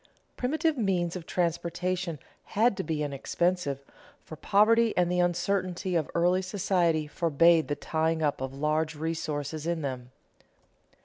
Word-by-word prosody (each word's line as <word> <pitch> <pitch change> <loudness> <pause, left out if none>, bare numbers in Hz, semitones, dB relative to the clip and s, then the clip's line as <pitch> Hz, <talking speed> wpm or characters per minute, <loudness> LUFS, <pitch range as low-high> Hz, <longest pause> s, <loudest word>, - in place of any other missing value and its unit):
Primitive 305 +3 0
means 180 -5 0
of 175 -2 -7
transportation 175 0 -1 0.4
had 225 0 +4
to 190 - -2
be 155 -3 -2
inexpensive, 145 +1 -1 0.4
for 155 - -9
poverty 220 +6 +3
and 175 -1 +2
the 180 - +1
uncertainty 180 +1 0
of 160 -4 0
early 175 +2 +3
society 180 -5 +1
forbade 165 +1 +3
the 145 - -1
tying 160 +1 -1
up 145 -3 0
of 130 0 -3
large 155 +3 -1
resources 155 -1 -3
in 170 -2 -1
them. 125 -3 -4
170 Hz, 135 wpm, -28 LUFS, 155-185 Hz, 0.4 s, had